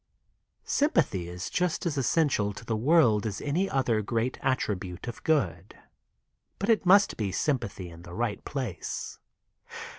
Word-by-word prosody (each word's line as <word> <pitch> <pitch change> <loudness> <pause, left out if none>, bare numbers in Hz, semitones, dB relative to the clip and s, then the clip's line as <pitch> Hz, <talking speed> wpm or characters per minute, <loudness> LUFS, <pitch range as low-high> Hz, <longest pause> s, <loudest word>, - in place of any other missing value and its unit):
Sympathy 145 - +1
is 90 +1 -5
just 180 0 -1
as 165 -4 0
essential 135 -6 +1
to 115 - -10
the 115 - -1
world 115 -4 +4
as 100 -2 -4
any 175 +7 0
other 120 -5 +1
great 115 +4 -1
attribute 100 -8 -2
of 120 - -7
good, 145 - 0 0.8
but 200 - -2
it 215 -5 +3
must 200 +2 +5
be 105 -4 -1
sym 135 +7 +1
pathy 95 -5 -7
in 85 0 -12
the 85 0 -10
right 110 -3 -2
place. 130 -9 -5
120 Hz, 150 wpm, -28 LUFS, 100-155 Hz, 0.8 s, must